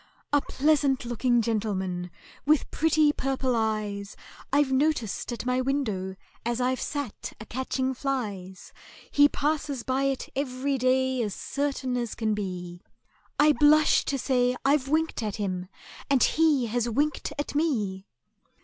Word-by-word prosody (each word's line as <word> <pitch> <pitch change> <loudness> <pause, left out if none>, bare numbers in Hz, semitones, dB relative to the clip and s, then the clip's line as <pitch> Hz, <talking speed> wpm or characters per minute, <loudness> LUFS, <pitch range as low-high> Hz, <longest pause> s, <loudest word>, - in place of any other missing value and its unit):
"A 290 - +5
pleasant 280 -3 +1
looking 240 0 +1
gentleman, 190 -5 -2 0.3
with 300 +1 +2
pretty 310 -1 +3
purple 265 -2 -1
eyes, 210 -2 -2 0.4
I've 285 -1 +3
noticed 265 -6 0
at 240 0 -5
my 250 0 +1
window, 215 -9 -1 0.3
as 235 +1 -1
I've 255 +1 0
sat 285 -7 -4
a 215 - -8
catching 260 +2 -2
flies; 205 -9 -4 0.4
He 290 0 +6
passes 290 -4 -1
by 265 +1 0
it 270 -1 -1
every 270 0 -1
day 260 0 +2
as 210 -4 -2
certain 280 -3 -2
as 235 -2 -3
can 220 -2 0
be— 180 -4 -5 0.6
I 300 +1 +7
blush 300 +1 +5
to 275 - -1
say 250 -1 +1
I've 275 -1 +3
winked 315 -1 0
at 210 -3 -2
him, 185 -3 -3 0.4
and 275 -3 +4
he 305 -6 +3
has 240 +1 -1
winked 290 +6 0
at 290 - -3
me!" 215 -11 -1
255 Hz, 140 wpm, -27 LUFS, 215-285 Hz, 0.6 s, I